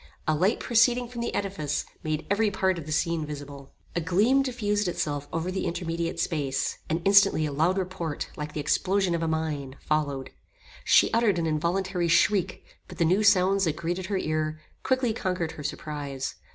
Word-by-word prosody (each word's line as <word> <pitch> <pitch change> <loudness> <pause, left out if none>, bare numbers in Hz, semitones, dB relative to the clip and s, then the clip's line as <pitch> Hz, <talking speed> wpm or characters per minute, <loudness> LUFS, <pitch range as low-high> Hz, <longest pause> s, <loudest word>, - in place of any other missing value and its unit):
A 155 - +3
light 185 +9 +2
proceeding 240 +1 +3
from 235 0 -6
the 235 - -2
edifice, 190 -8 -2 0.2
made 155 0 -2
every 210 +1 +3
part 190 -2 0
of 155 - -9
the - - -5
scene 165 +1 0
visible. 145 -2 -8 0.2
A 170 - +1
gleam 205 +11 +3
diffused 210 -6 -1
itself 145 -4 -2
over 165 +3 -2
the 190 - -2
intermediate 170 -1 -3
space, 140 -5 -1
and 165 +2 -1
instantly 195 -5 +5
a 150 - -2
loud 165 +7 +1
report, 180 -5 -3
like 150 0 -6
the - - -4
explosion 185 +5 +1
of 170 - -1
a 165 - 0
mine, 155 -4 -2
followed. 145 -3 -1 0.5
She - - +5
uttered 225 -5 +3
an 170 - 0
involuntary 175 +3 0
shriek, 180 +3 +2 0.2
but 180 - -11
the 170 - +2
new 185 +6 +3
sounds 195 -1 +4
that 160 -2 0
greeted 175 +3 -3
her 200 -1 -1
ear, 155 -2 -1 0.2
quickly 260 -3 +1
conquered 180 -6 -2
her 150 - -9
surprise. 145 -2 -4
170 Hz, 180 wpm, -27 LUFS, 155-195 Hz, 0.5 s, instantly